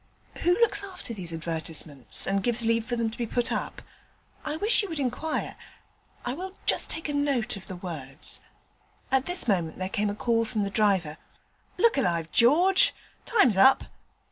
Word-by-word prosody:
'Who 355 +3 +1
looks 410 -3 +2
after 370 -11 -6
these 180 -5 -4
advertisements, 160 -5 -1
and 195 0 0
gives 235 +1 0
leave 230 0 +1
for 240 0 -2
them 230 -1 -1
to - - -11
be 235 - -2
put 240 +2 -1
up? - - -4 0.6
I 300 0 -3
wish 425 +9 +5
you 405 - -5
would 320 -3 -4
inquire. 280 +4 -3 0.7
I 245 - -2
will 375 +6 -7
just - - +3
take 320 - -4
a 295 - -3
note 275 -6 0
of 195 - -10
the 185 - -6
words.' 155 -6 -3 0.7
At 265 0 +1
this 355 -6 +3
moment 175 -7 0
there 185 0 -3
came 210 0 -1
a 205 - -4
call 230 +1 +1
from 220 -2 -2
the 200 - -3
driver: 190 -8 +1 0.6
'Look 465 -9 +3
alive, 170 -8 -1
George, 360 - +4 0.3
time's 400 - +3
up.' 265 +7 +6
230 Hz, 180 wpm, -26 LUFS, 190-300 Hz, 0.7 s, up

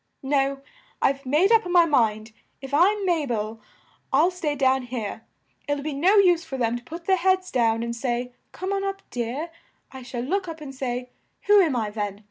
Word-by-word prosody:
No, 275 0 0 0.4
I've 275 0 0
made 320 - +3
up 450 -1 +5
my 350 -1 +5
mind; 220 -7 +1 0.3
if 270 0 -9
I'm 390 +6 +3
Ma 330 -5 +1
bel, 220 -1 -3 0.5
I'll 310 +7 +4
stay 320 -5 -2
down 265 -1 +2
here! 225 -3 -5 0.4
It'll 290 -1 -1
be 305 0 -3
no 350 +9 +3
use 360 -4 +5
for 270 - -6
them 235 -2 0
to 240 - -6
put 335 +6 -9
their 380 +1 +3
heads 370 +1 +1
down 230 -2 +1
and 235 0 -3
say, 245 0 -2 0.2
'Come 375 +2 -4
up, 390 0 -4
dear!' 250 +8 -3 0.4
I 265 - -9
shall 245 -1 -5
look 370 +7 -1
up 325 -1 -7
and 285 -3 -8
say, 250 -1 -4 0.3
'Who 410 -1 +6
am 315 -8 +1
I, 220 -3 -1
then? 205 -2 -4
275 Hz, 195 wpm, -24 LUFS, 240-350 Hz, 0.5 s, Who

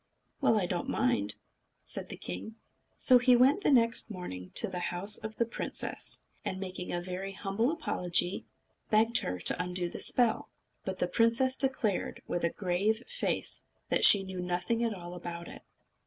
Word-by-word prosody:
"Well, 225 - +3
I 185 - -1
don't 175 +6 -3
mind," 175 - 0 0.5
said - - -3
the - - -7
king. 90 - -7 0.4
So 255 -2 +7
he 250 0 +5
went 265 +9 +4
the - - +1
next 230 -4 +3
morning 90 - -7
to 225 - +5
the 185 -2 -5
house 180 +4 +1
of 220 0 -7
the 235 - +1
princess, 230 - -4 0.2
and, 190 - -4
making 185 -1 -6
a 175 - -1
very 185 +2 -6
humble 200 +5 -1
apology, 180 - -1 0.4
begged 225 +2 +4
her 90 - -3
to - - +2
undo 180 -1 -1
the - - -8
spell. 240 -3 +3 0.3
But - - -4
the - - 0
princess 235 +3 +2
declared, 260 -8 -1
with 175 - -3
a 170 - +2
grave 200 +5 -1
face, - - -1 0.3
that - - +1
she 200 -2 +9
knew 190 -1 -7
nothing 180 +6 -1
at 225 -3 -1
all 175 -1 -9
about 170 -1 -7
it. - - -11
195 Hz, 175 wpm, -30 LUFS, 180-230 Hz, 0.5 s, she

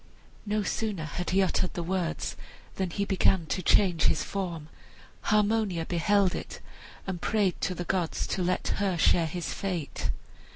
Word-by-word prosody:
No 210 0 +1
sooner 205 -6 -2
had 175 +4 -4
he 195 +1 +4
uttered 185 0 0
the 175 - -2
words 175 -1 -2 0.4
than 190 -2 0
he 200 +4 -1
began 190 -2 +3
to 185 - -2
change 180 -2 +4
his - - +3
form. 175 -6 -4 0.6
Harmonia 210 -5 +2
beheld 185 +3 +2
it - - -6 0.5
and 185 -3 -4
prayed 205 -4 +1
to 185 - 0
the 175 - -4
gods 180 -3 0
to 190 - -2
let 180 +1 0
her 195 -3 +1
share 165 +1 +4
his 175 +2 -4
fate. 180 -6 -3
185 Hz, 160 wpm, -28 LUFS, 170-200 Hz, 0.6 s, he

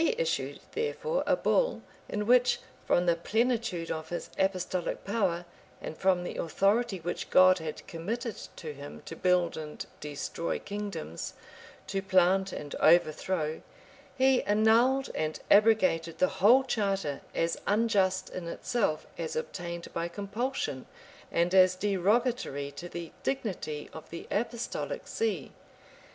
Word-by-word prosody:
He 460 - +2
issued, - - -1
therefore, 470 +2 -1
a - - +4
bull, - - +1 0.3
in 210 0 -2
which, 250 +2 +4 0.3
from 175 - +3
the 170 -1 +4
plenitude 220 -2 0
of 160 0 -4
his 175 - -5
apostolic 185 -2 -1
power, 190 -5 0 0.3
and - - -6
from 185 -1 +2
the - - -5
authority 200 +5 +1
which 175 +1 -4
God 185 0 +6
had 160 -1 -6
committed 225 +8 -4 0.2
to 155 -2 -6
him, 145 0 -10
to 165 - -7
build 180 -1 +2
and 155 -1 -6
destroy 150 +3 -3
kingdoms, 200 - -5 0.5
to 195 0 -2
plant 190 0 +3
and 145 -4 -6
overthrow, 160 0 +3 0.6
he 260 0 +4
annulled 230 +6 +4
and 155 0 -2
abrogated 190 -6 +4
the 185 - +3
whole 245 +7 +7
charter, 195 - -1
as 165 0 0
unjust 200 -3 +2
in 180 -2 -5
itself, 170 -3 -1
as 160 -2 -3
obtained 170 +2 -5
by 170 0 -1
compulsion, 200 - -3 0.4
and 170 +2 +1
as 185 -1 +6
derogatory 200 - 0
to 175 +5 -8
the 170 -1 -6
dignity 185 - -3
of 160 - -10
the 170 - -7
apostolic 235 - -3
see. 450 0 -2
185 Hz, 135 wpm, -30 LUFS, 170-225 Hz, 0.6 s, whole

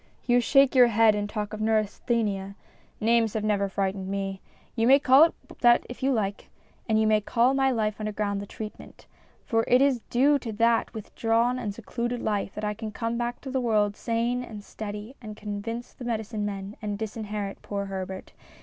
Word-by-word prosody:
You 245 0 +4
shake 275 +2 +4
your 250 -2 +7
head 225 -1 +4
and 205 0 -2
talk 210 -1 -4
of 215 - -5
neurasthenia; 215 -2 0 0.4
names 225 -1 +2
have 215 - -1
never 200 -2 +1
frightened 190 0 -2
me. 195 -1 -3 0.3
You 225 -1 +2
may 270 +2 +8
call 280 +1 +7
it 335 - -3 0.2
that 240 -1 +5
if 245 - -9
you 270 +1 +2
like, 205 -5 -2 0.4
and 220 0 +3
you 220 - +3
may 215 -1 +3
call 240 +5 +2
my 270 0 +3
life 215 -4 0
under 215 0 -2
ground 200 -1 -2
the 200 - -8
treatment. 215 +1 -9 0.4
For 225 -1 +1
it 250 - +5
is 270 -3 +3
due 280 +4 +4
to 235 -3 -5
that 230 +2 +2
with 215 - -8
drawn 235 +2 +1
and 220 -5 -3
secluded 235 +2 -3
life 205 -3 -2
that 210 - -5
I 210 - -1
can 215 0 -6
come 230 +2 -3
back 240 0 -3
to. 265 - -7
the 260 -1 0
world 210 -4 +1
sane 235 +2 -1
and 215 -4 -9
steady 210 +4 -7
and 215 -2 -8
convince 220 +3 -5
the - - -10
medicine 220 -3 -2
men 200 +1 -6
and 205 -2 -3
disinherit 210 -2 -5
poor 200 -1 -4
Herbert. 190 -1 -6
220 Hz, 200 wpm, -26 LUFS, 205-240 Hz, 0.4 s, may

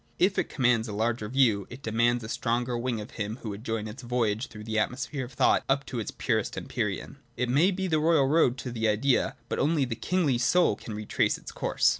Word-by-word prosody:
If 190 +2 +3
it - - -1
commands 125 -3 +2
a 105 - -5
larger 110 0 -1
view, 115 -6 +3
it 130 +3 -10
de 110 - -3
mands 120 +1 +2
a - - -6
stronger 120 +2 -1
wing 120 -1 -1
of 105 - -8
him 105 +1 -4
who 110 - -4
would 100 +2 -7
join 110 -2 -2
its 110 +5 -8
voyage 120 -1 0
through 105 -1 -10
the 110 0 -1
atmosphere 130 +4 -2
of 125 - -13
thought - - +3
up 140 0 +2
to 125 - -4
its 110 - -3
purest - - -1
empyrean. - - -3 0.2
It 125 - 0
may 150 +9 +4
be 190 0 -2
the 160 -4 +2
royal 155 -3 +4
road 135 -4 +3
to 125 - -3
the 115 -1 0
Idea, 115 +5 +2
but - - -2
only 150 0 +2
a - - -1
kingly 130 +3 0
soul 170 -1 +3
can 105 +1 -8
retrace 105 0 0
its - - -10
course. - - +2
120 Hz, 235 wpm, -28 LUFS, 110-135 Hz, 0.2 s, may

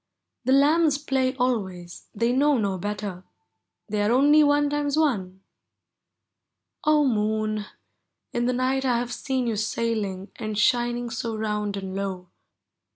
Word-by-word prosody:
The 260 - +2
lambs 295 +2 +4
play 265 -2 0
always, 190 -9 -2
— - - -42
they 230 +3 +1
know 285 +2 +3
no 200 -4 -1
better; 205 -2 -4 0.6
They 210 -1 -1
are 205 +2 +2
only 290 +4 +5
one 290 0 +3
times 290 0 -1
one. 195 -12 0 1.4
0 305 -1 +5
Moon! 215 -2 0 0.7
in 240 0 0
the 250 - +1
night 260 +2 0
I 250 -3 +2
have 240 0 -3
seen 260 -2 -2
you 225 -3 -1
sailing 215 -3 -2
And 215 -2 -4
shining 240 +1 +1
so 225 -1 -3
round 210 -2 -2
and 190 -1 -6
low. 190 -2 -4
235 Hz, 145 wpm, -25 LUFS, 205-265 Hz, 1.4 s, only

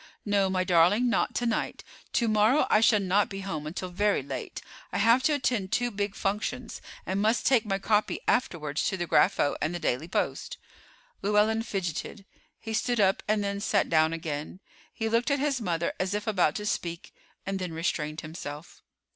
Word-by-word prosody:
"No, 200 -2 +2
my 185 -1 +1
darling, 185 +8 +4
not - - 0
to 240 - 0
night. 230 -2 -2 0.3
To 235 - +2
morrow 215 +6 +4
I 215 - +5
shall 220 -2 +5
not 200 +1 +2
be 195 0 -6
home 155 -6 -4
until 180 +3 -5
very 205 -3 +1
late. 140 - -6 0.3
I - - -2
have 230 +5 +5
to 300 +3 +2
attend 240 -9 -1
two 245 +1 +1
big 205 -1 -3
functions, 220 +4 -3 0.2
and 190 +2 -1
must 220 +3 +1
take 250 -5 +4
my 195 -1 0
copy 210 +2 +1
afterwards 155 - 0
to 190 - -1
the 175 - -2
Grapho 145 -3 +3
and 160 +4 -1
the - - -3
Daily 140 +3 -1
Post." - - -2 0.6
Llewellyn 210 +2 +2
fidgeted; 195 -1 -4 0.3
he 225 - -6
stood 240 +1 0
up 195 -1 +3
and 210 -1 +1
then 200 0 -2
sat 205 -1 +1
down 160 0 +4
again. 160 +1 -5 0.3
He 225 - -3
looked 230 +4 +1
at 280 - +2
his 275 -3 0
mother 170 -4 -1
as 185 +2 -1
if 210 +1 -3
about 185 -8 +2
to 210 - -4
speak, 170 -5 -3 0.3
and 195 0 -2
then 180 -2 -4
restrained 160 -1 -2
himself. 155 -1 -8
200 Hz, 190 wpm, -28 LUFS, 175-220 Hz, 0.6 s, I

